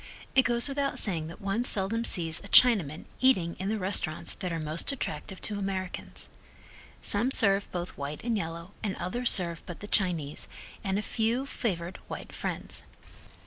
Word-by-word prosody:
It 265 - +5
goes 240 +2 +6
without 275 0 -1
saying 165 -6 +2
that 165 - -10
one 200 +4 -1
seldom 225 +1 -1
sees 165 -6 +3
a 200 - -11
Chinaman 195 - +5
eating 185 -11 +3
in 190 +1 -2
the 220 - -1
restaurants 185 -5 +1
that 180 -2 -5
are 165 - -2
most 155 - 0
attractive 210 -7 -5
to 205 -1 -2
Americans. 190 -2 -4 0.8
Some 220 +5 +3
serve 200 -6 +4
both 175 0 -5
white 145 +1 -6
and 235 -1 0
yellow 170 -1 -5
and 205 -3 -2
others 240 +7 -1
serve 170 -3 +3
but 175 - -7
the - - -8
Chinese, 175 -8 0 0.4
and 195 -2 -1
a 210 - -2
few 235 +5 -1
favored 185 -9 -3
white - - -8
friends. - - -4
195 Hz, 170 wpm, -28 LUFS, 170-230 Hz, 0.8 s, goes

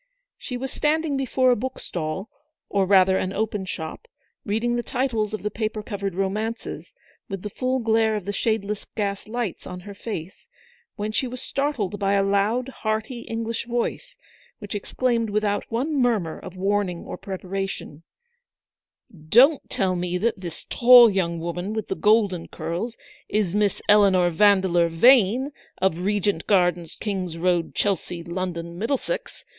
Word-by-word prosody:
She 250 - -5
was 265 +2 -4
standing 305 0 0
before 260 -1 +2
a - - +4
book 255 +4 -4
stall, 170 +4 -4 0.4
or 195 -2 +1
rather 190 -1 +5
an 185 - -2
open 210 -2 -2
shop, 160 -4 -6 0.4
reading 225 +4 0
the 240 - 0
titles 240 -4 -1
of 215 - -5
the 210 - -1
paper 215 0 -3
covered 200 -4 -4
romances, 210 +4 -3 0.3
with 195 -2 -5
the 210 - -5
full 255 +3 0
glare 225 -2 +2
of 205 -4 -4
the 205 - -3
shadeless 210 -1 -1
gas 200 -1 -2
lights 230 -4 -4
on 180 0 -7
her 200 +2 -9
face, 195 -4 -7 0.5
when 210 0 -3
she 230 +4 0
was 250 +1 -6
startled 260 -8 -2
by 200 -1 +1
a 200 -1 +3
loud, 205 +6 +1
hearty 220 0 -3
English 230 0 -3
voice, 245 - -3 0.4
which 205 -2 -7
exclaimed 230 +2 0
without 205 +1 -1
one 260 +7 -1
murmur 225 - +1
of 185 - -10
warning 195 -2 0
or - - -5
preparation: 195 -5 -5 1.1
96 - - -26 0.2
ELEANOR'S 265 +6 +9
VICTORY. - - -5
"Don't - - -37
tell 185 -2 0
me 180 0 -1
that 220 0 -1
this 170 -3 -7
tall 245 -2 +8
young 170 -3 -1
woman 175 +4 -3
with 220 -2 -4
the - - -1
golden 210 -5 +2
curls, 220 +8 -4 0.3
is 205 -4 0
Miss 205 -1 +1
Eleanor 195 -4 +5
Vandeleur 185 -2 +4
Vane, 240 - +5 0.3
of 180 -3 +1
Regent 200 -2 0
Gardens, 175 -4 +2
King's 185 -5 -3
Road, 175 -1 0
Chelsea, 180 -3 -1
London, 170 -1 -4
Middlesex. 285 - -3
205 Hz, 160 wpm, -24 LUFS, 185-230 Hz, 1.1 s, ELEANOR'S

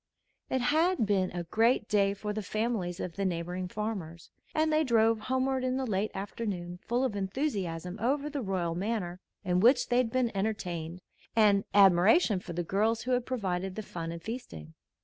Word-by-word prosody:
It 260 - 0
had 315 +2 +2
been 195 -3 +1
a 175 -1 -4
great 225 +6 +2
day 200 -1 +2
for 210 +1 -4
the 215 - -3
families 210 -4 -2
of 175 0 -5
the 200 - -1
neighboring 180 0 -2
farmers, 180 -5 -5 0.2
and 310 0 +2
they 310 +1 +4
drove 225 -4 +3
homeward 260 +2 0
in 255 0 0
the 265 - -1
late 210 -2 0
afternoon 190 -3 -4
full 240 +2 0
of 250 -6 -1
enthusiasm 190 - -3
over 280 +5 +1
the 290 -2 -3
royal 185 -5 -1
manner 185 -1 -2 0.2
in 180 -2 +1
which 245 +7 +4
they 245 - +2
had 250 -2 +2
been 245 -3 0
entertained 180 -5 -3 0.3
and 205 -3 +4
admiration 195 - +5
for 180 -1 -8
the 175 +1 -2
girls 215 +6 +1
who 255 - -2
had 250 -1 +1
provided 190 -6 -2
the 215 - -4
fun 165 -4 -5
and 170 0 -8
feasting. 85 - -7
205 Hz, 185 wpm, -30 LUFS, 180-240 Hz, 0.3 s, admiration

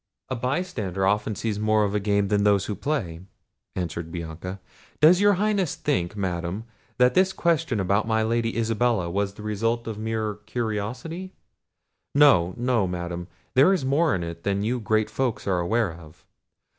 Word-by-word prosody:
"A 130 - -1
bystander 120 - -2
often 105 +2 +1
sees 105 -1 -2
more 110 0 +3
of 100 - 0
the 105 - 0
game 100 -1 +1
than 100 -1 +2
those 100 -2 +3
that 105 -3 -5
play," 115 - -2 0.6
answered 85 -2 -4
Bianca. 85 +3 -6 0.4
"Does 170 +5 +6
your 205 0 +6
Highness 200 -3 0
think, 105 -11 -1
Madam, 90 +1 -2 0.3
that 125 0 +4
this 190 +4 +4
question 165 - 0
about 100 +3 +1
my 110 -1 +2
Lady 115 +1 0
Isabella 115 -5 +1
was 100 +1 -1
the 105 - -10
result 115 +3 -1
of 110 -2 -5
mere 110 -1 -2
curiosity? 125 - -4 0.8
No, 95 -12 +5
no, 120 -5 +1
Madam, 85 -1 -4 0.3
there 140 +9 +6
is 170 -8 -1
more 150 +4 +2
in 90 - -3
it 85 0 -6
than 100 +1 -1
you 120 +3 0
great 110 0 0
folks 130 -4 -1
are 95 -2 +1
aware 105 +1 0
of. 80 -2 -15
110 Hz, 170 wpm, -25 LUFS, 95-125 Hz, 0.8 s, Does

